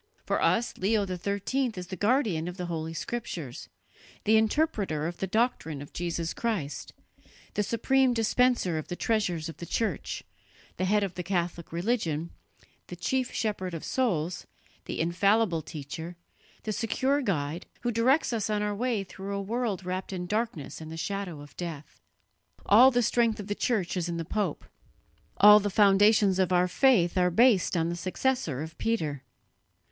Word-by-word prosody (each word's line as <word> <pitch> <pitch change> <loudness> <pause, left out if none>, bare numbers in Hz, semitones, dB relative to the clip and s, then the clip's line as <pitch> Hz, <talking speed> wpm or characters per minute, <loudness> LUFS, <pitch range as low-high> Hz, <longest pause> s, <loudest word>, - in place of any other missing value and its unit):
For - - 0
us 235 +1 +2
Leo 205 +2 +2
XIII 200 +7 -1
is 180 -1 -5
the 190 - -4
guardian 205 - +1
of 180 +1 -6
the 180 - -3
Holy 165 -1 -4
Scriptures, 165 - -5 0.5
the 220 - +4
interpreter 220 - +1
of 170 +1 -4
the 190 - -2
doctrine 205 - 0
of 145 - -10
Jesus 170 -1 -2
Christ, 190 - -3 0.6
the 210 - 0
supreme 255 +5 +2
dispenser 230 -6 +2
of 155 - -7
the 175 - -4
treasures 180 -7 0
of 165 - -8
the 170 - -7
Church, 225 -2 -2 0.5
the 185 - 0
head 205 +2 +2
of 195 -3 -3
the 180 - -4
Catholic 175 -2 -2
religion, 170 -4 -1 0.6
the 180 - -7
chief 255 +8 -1
shepherd 190 -5 -2
of 160 - -6
souls, 180 -9 -1 0.4
the - - -5
infallible 180 +1 +2
teacher, 160 +3 -7 0.5
the 215 - -2
secure 260 +6 0
guide, 165 - -2
who 240 - 0
directs 250 +5 +2
us 215 -2 -1
on 210 -1 0
our 210 0 -1
way 230 -1 -1
through 195 +1 -6
a - - -2
world 210 -2 -2
wrapped 185 +1 -3
in 180 -2 -4
darkness 210 - -3
and 160 0 -8
the 165 - -6
shadow 180 -2 -4
of 145 -2 -13
death. 160 -5 -7 0.7
All 240 +6 +8
the 245 -2 +1
strength 230 -1 +2
of 205 - -5
the 205 - -2
Church 205 -5 -1
is 175 -1 -2
in 170 - -2
the 165 - -3
pope; 200 -3 -2 0.7
all 210 +1 +9
the 205 0 -1
foundations 200 0 +4
of 185 -1 +2
our 180 0 +4
faith 185 -5 +3
are 180 0 +4
based 200 -2 +4
on 165 0 +1
the 170 - -2
successor 180 - -1
of 160 0 -9
Peter. 155 - -1
195 Hz, 170 wpm, -28 LUFS, 170-225 Hz, 0.7 s, all